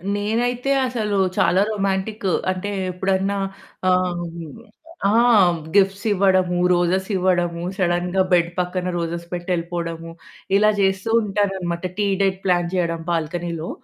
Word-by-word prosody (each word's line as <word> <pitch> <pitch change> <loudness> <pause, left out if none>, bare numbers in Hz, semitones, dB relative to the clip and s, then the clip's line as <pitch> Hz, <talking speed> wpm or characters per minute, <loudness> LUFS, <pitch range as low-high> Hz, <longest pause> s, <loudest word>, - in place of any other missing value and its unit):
నేనైతే 240 +5 -1 0.2
అసలు 215 -5 -2 0.2
చాలా 185 +3 +3
రొమాంటికు, 195 0 -1 0.2
అంటే 185 +2 -4 0.2
ఎప్పుడన్నా 190 +2 0 0.5
ఆహ్, 180 -1 +1 0.9
ఆ! - - +2 0.6
గిఫ్ట్స్ 195 +1 +3
ఇవ్వడము, 185 -2 +2 0.2
రోజెస్ 180 +2 +1
ఇవ్వడము, 175 -2 0
సడెన్‌గా 180 0 +1
బెడ్ 170 -1 +3
పక్కన 180 0 -2
రోజెస్ 170 0 -3
పెట్టి 175 +1 -5
ఎళ్ళిపోవడము, 165 -1 -5 0.5
ఇలా 215 +1 +4
జేస్తూ 190 +2 0
ఉంటాననమాట. 190 -4 -2
టీ 205 -1 +1
డేట్ 190 -1 +1
ప్లాన్ 175 -2 +2
చేయడం 170 -2 -1
బాల్కనీలో, 170 0 -3
185 Hz, 115 wpm, -21 LUFS, 175-195 Hz, 0.9 s, ఇలా